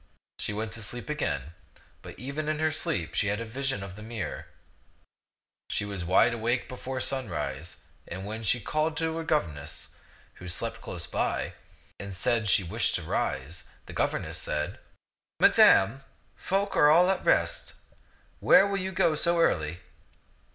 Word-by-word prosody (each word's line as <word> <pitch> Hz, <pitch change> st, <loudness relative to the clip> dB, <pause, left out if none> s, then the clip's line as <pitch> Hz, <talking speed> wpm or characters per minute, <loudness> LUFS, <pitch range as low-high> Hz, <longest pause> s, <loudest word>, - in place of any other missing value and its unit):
She -, -, -2 dB
went 110 Hz, +1 st, -3 dB
to 115 Hz, -, -3 dB
sleep 120 Hz, +6 st, -4 dB
again, 80 Hz, -, -2 dB, 0.5 s
but -, -, -10 dB
even 140 Hz, +4 st, -4 dB
in 155 Hz, -, 0 dB
her 155 Hz, 0 st, +1 dB
sleep 100 Hz, -, -1 dB
she 105 Hz, -, +1 dB
had 105 Hz, +2 st, 0 dB
a 115 Hz, -, -4 dB
vision 135 Hz, -2 st, -2 dB
of 95 Hz, -1 st, -8 dB
the 105 Hz, -, -11 dB
mirror. 110 Hz, -6 st, -5 dB, 1.2 s
She 105 Hz, -, -1 dB
was 100 Hz, -3 st, -4 dB
wide 95 Hz, +7 st, +4 dB
awake 115 Hz, +2 st, 0 dB
before 130 Hz, +1 st, -5 dB
sunrise, 130 Hz, -9 st, -3 dB, 0.3 s
and 100 Hz, +5 st, -6 dB
she 120 Hz, +3 st, +2 dB
called 155 Hz, +6 st, -1 dB
her 160 Hz, 0 st, -1 dB
governess, 85 Hz, -, -2 dB, 0.5 s
who 90 Hz, -, -7 dB
slept 90 Hz, -, -1 dB
close -, -, -3 dB
by, -, -, -1 dB, 0.5 s
and 100 Hz, -1 st, -6 dB
said 115 Hz, +1 st, +1 dB
she 95 Hz, -, +4 dB
wished 85 Hz, -, +1 dB
to -, -, -2 dB
rise. 75 Hz, +7 st, -2 dB, 0.2 s
The -, -, -10 dB
governess -, -, -1 dB
said, 75 Hz, 0 st, -2 dB, 0.6 s
"Madame, 115 Hz, +8 st, +6 dB, 0.3 s
folk 195 Hz, +2 st, -1 dB
are 150 Hz, -, +6 dB
all 175 Hz, +4 st, +6 dB
at 190 Hz, -, -2 dB
rest. -, -, +1 dB, 0.6 s
Where 195 Hz, -, +7 dB
will 200 Hz, -1 st, -1 dB
you 190 Hz, 0 st, -3 dB
go 165 Hz, -3 st, +3 dB
so 170 Hz, +2 st, +2 dB
early?" 85 Hz, -, +1 dB
115 Hz, 155 wpm, -28 LUFS, 95-155 Hz, 1.2 s, Where